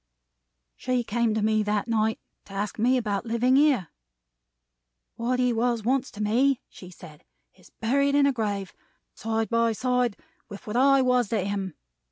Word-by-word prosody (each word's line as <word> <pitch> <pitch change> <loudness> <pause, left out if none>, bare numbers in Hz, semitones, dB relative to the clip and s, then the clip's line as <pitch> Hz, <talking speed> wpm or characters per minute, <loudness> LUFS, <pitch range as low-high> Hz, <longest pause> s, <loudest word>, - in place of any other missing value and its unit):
"She 250 -1 -1
came 230 0 0
to 220 - 0
me 215 0 +2
that 210 0 -1
night 220 -1 0 0.3
to 195 - -13
ask 205 +2 -4
me 250 +4 +3
about 210 -5 -2
living 235 +3 +1
here. 275 - +3 1.2
'What 245 +2 -1
he 250 -1 +2
was 235 -1 0
once 260 +3 0
to 210 - -6
me,' 250 +5 +2
she 180 - -12
said, 165 -4 -14 0.3
'is - - -21
buried 280 +5 +2
in 285 -1 +4
a 280 - +2
grave, 205 -5 -3 0.4
side 225 -1 -2
by 230 0 +2
side 250 -1 0 0.3
with 200 -1 -10
what 210 - -5
I 270 +1 +4
was 250 -4 +2
to 220 -3 0
him. 195 -4 -3
230 Hz, 170 wpm, -26 LUFS, 210-250 Hz, 1.2 s, in